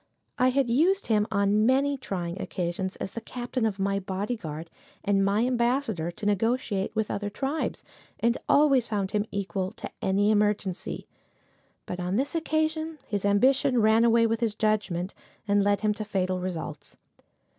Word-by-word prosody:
I 255 - +5
had 265 0 +2
used 335 +12 +2
him 210 -2 +2
on 200 +1 +2
many 275 +2 +3
trying 180 -8 -4
occasions, 185 +2 -3
as 190 - -5
the 230 - -6
captain 245 0 -2
of 200 -3 -3
my 195 0 0
bodyguard, 185 -5 -4 0.3
and 195 -1 +2
my 205 +4 +2
ambassador 235 - 0
to 175 +4 -7
negotiate 205 -1 0
with 215 -1 0
other 205 0 -2
tribes, 275 +8 -3 0.4
and 235 +1 +2
always 275 -5 +5
found 200 -3 -2
him 210 0 0
equal 190 -1 -3
to - - -8
any 200 +2 +2
emergency; 205 -3 0 0.8
but 180 - -5
on 180 +2 -1
this 270 +5 0
occasion 315 0 -1
his 205 -2 -2
ambition 255 +5 +3
ran 220 +1 +5
away 230 0 +5
with 225 0 0
his 225 -3 0
judgment, 210 -4 0 0.3
and 200 0 +3
led 205 0 +2
him 215 -1 +2
to 215 - -5
fatal 185 -3 -1
results. 165 -5 -6
210 Hz, 160 wpm, -27 LUFS, 195-245 Hz, 0.8 s, I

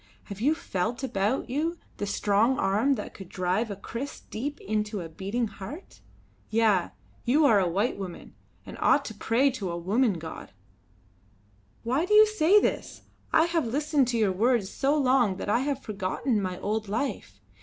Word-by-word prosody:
Have 200 0 -9
you 295 +6 +3
felt 220 - -3
about 230 -1 0
you 310 +7 -1 0.2
the 205 - -3
strong 210 +5 +2
arm 220 +5 +2
that 210 - -6
could 190 -3 -11
drive 185 +5 -1
a 200 - -4
kriss 235 +7 -6
deep 285 +6 -5
into 210 -1 -2
a 165 - -6
beating 200 +9 -2
heart? 210 - -10 0.5
Yah! 215 - +2 0.3
you 290 +6 +3
are 220 -7 +5
a 185 - +2
white 200 +6 0
woman, 185 -3 -8 0.3
and - - -10
ought 285 - +4
to 220 - -6
pray 235 +6 +2
to 205 -8 -4
a 170 - -3
woman 210 +7 +2
god!" 160 - -8 1.3
"Why 265 +9 0
do 420 - +3
you 430 0 +9
say 420 -2 +4
this? - - -2 0.3
I 320 - +5
have 335 -6 0
listened 285 +2 +1
to 240 -1 0
your 215 -4 +2
words 225 0 +1
so 280 +2 +1
long 255 -8 +3
that 205 - -5
I 220 - +3
have 275 0 -2
forgotten 210 +3 -1
my 185 -1 -3
old 215 +2 -2
life. 230 +7 -3
225 Hz, 175 wpm, -27 LUFS, 200-275 Hz, 1.3 s, you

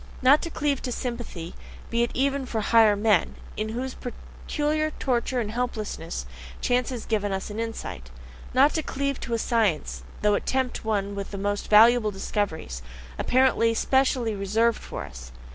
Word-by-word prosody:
Not 275 +4 +6
to 335 - -4
cleave 290 -4 -1
to 255 - -4
a - - -2
sympathy, 235 -10 -5 0.4
be 235 0 +2
it 235 - +2
even 275 0 0
for 225 - -2
higher 220 -1 +5
men, 205 -4 +2 0.2
into 215 +1 -3
whose 260 +1 -3
peculiar 300 +5 -3
torture 250 -1 0
and 215 -3 -2
helplessness 215 - -3 0.3
chance 245 0 +1
has 245 -4 -5
given 205 -2 0
us 190 +2 -3
an 210 - -5
insight. 225 - -5 0.4
Not 275 +4 +5
to 320 - 0
cleave 280 -2 -2
to 235 - -2
a - - +1
science, 190 - 0 0.2
though 210 0 +4
it - - -1
tempt 260 -1 -1
one 205 -2 -1
with 200 -1 -5
the 200 - -6
most 205 +1 -2
valuable 225 +1 +7
discoveries, 190 - -3 0.4
apparently 250 -3 +3
specially 260 -3 +2
reserved 215 +4 +1
for - - -6
us. 65 0 -10
230 Hz, 170 wpm, -26 LUFS, 205-255 Hz, 0.4 s, valuable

